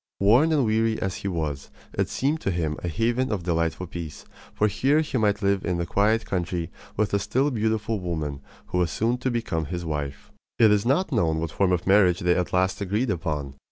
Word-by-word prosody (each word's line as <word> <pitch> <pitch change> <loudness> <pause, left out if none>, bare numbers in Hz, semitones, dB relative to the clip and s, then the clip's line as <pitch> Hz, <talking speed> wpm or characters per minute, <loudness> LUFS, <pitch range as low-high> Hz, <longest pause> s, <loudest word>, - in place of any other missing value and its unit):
Worn 120 +11 +5
and 145 -5 +3
weary 110 0 +1
as 95 -2 -2
he - - -5
was, 80 -6 -3 0.2
it - - 0
seemed 150 +4 0
to - - -1
him 80 -4 -1
a - - -2
haven 120 - 0
of 100 -5 -2
delightful 85 0 -1
peace; 85 -4 -7 0.3
for 105 - +1
here 135 +9 +2
he 150 -5 -2
might 105 -1 +1
live 100 -1 +2
in 90 -1 -1
the 85 - -1
quiet 105 +5 +2
country 85 -2 -2 0.3
with 105 -1 +1
the 100 - +2
still 130 +9 +1
beautiful 110 -2 0
woman 80 -6 -3 0.3
who 90 - 0
was 90 -2 +2
soon 120 +7 0
to 130 - -1
become 115 -10 -2
his 85 +3 -4
wife. 75 -3 -4 0.3
It 110 -2 +6
is 105 +2 +2
not 155 +7 +2
known 85 - +1
what 80 -1 -3
form 95 +2 +1
of 90 -1 0
marriage 95 -3 +4
they 90 0 +3
at 90 - -1
last 95 +2 +1
agreed 105 +5 0
upon. 75 -6 -3
100 Hz, 215 wpm, -25 LUFS, 85-115 Hz, 0.3 s, It